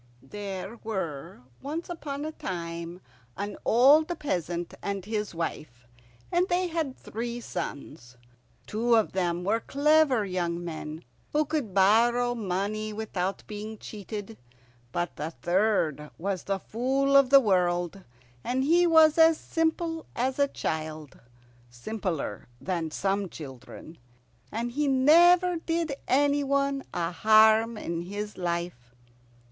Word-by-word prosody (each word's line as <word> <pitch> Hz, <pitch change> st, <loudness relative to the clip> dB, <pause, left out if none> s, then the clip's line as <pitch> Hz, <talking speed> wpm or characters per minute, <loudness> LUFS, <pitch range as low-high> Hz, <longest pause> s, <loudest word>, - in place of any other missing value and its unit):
There 200 Hz, -, -6 dB
were 170 Hz, -, -5 dB, 0.2 s
once 310 Hz, +5 st, -4 dB
upon 295 Hz, -4 st, -5 dB
a 310 Hz, -, -3 dB
time 170 Hz, -, -6 dB, 0.4 s
an 205 Hz, +1 st, -4 dB
old 280 Hz, +7 st, +6 dB
peasant 175 Hz, -, -3 dB
and 200 Hz, -2 st, -3 dB
his 210 Hz, -3 st, -3 dB
wife, 130 Hz, -7 st, -5 dB, 0.4 s
and 355 Hz, +2 st, +2 dB
they 360 Hz, 0 st, +1 dB
had 320 Hz, -5 st, -2 dB
three 235 Hz, +2 st, -5 dB
sons. 140 Hz, -, -7 dB, 0.5 s
Two 230 Hz, +2 st, +1 dB
of 220 Hz, -2 st, +2 dB
them 175 Hz, -2 st, -1 dB
were 215 Hz, +5 st, +1 dB
clever 285 Hz, -3 st, +3 dB
young 175 Hz, -2 st, -2 dB
men 160 Hz, -1 st, -6 dB, 0.3 s
who 300 Hz, +1 st, +2 dB
could 280 Hz, -10 st, -3 dB
borrow 235 Hz, +5 st, +4 dB
money 215 Hz, 0 st, -2 dB
without 200 Hz, -3 st, -3 dB
being 215 Hz, +1 st, -7 dB
cheated, 210 Hz, +1 st, -8 dB, 0.5 s
but 175 Hz, +4 st, -3 dB
the 150 Hz, +2 st, -3 dB
third 170 Hz, -4 st, 0 dB
was 190 Hz, +1 st, -3 dB
the 195 Hz, 0 st, 0 dB
Fool 265 Hz, +7 st, 0 dB
of 275 Hz, -2 st, +6 dB
the 275 Hz, 0 st, +9 dB
World. 180 Hz, -4 st, 0 dB, 0.4 s
He 295 Hz, +8 st, +3 dB
was 320 Hz, -1 st, +6 dB
as 325 Hz, 0 st, +7 dB
simple 325 Hz, 0 st, -1 dB
as 260 Hz, +3 st, -1 dB
a 280 Hz, -, +4 dB
child, 155 Hz, -, -5 dB, 0.5 s
simpler 160 Hz, -, -4 dB
than 170 Hz, -4 st, -2 dB
some 195 Hz, +3 st, -1 dB
children, 150 Hz, +2 st, -11 dB, 0.5 s
and 235 Hz, +2 st, -3 dB
he 290 Hz, +4 st, 0 dB
never 340 Hz, +7 st, +5 dB
did 330 Hz, -2 st, -2 dB
any 285 Hz, +2 st, +3 dB
one 275 Hz, 0 st, 0 dB
a 170 Hz, 0 st, -2 dB
harm 220 Hz, +4 st, +5 dB
in 170 Hz, -4 st, -3 dB
his 205 Hz, +4 st, -5 dB
life. 170 Hz, -9 st, -4 dB
215 Hz, 125 wpm, -27 LUFS, 175-275 Hz, 0.5 s, the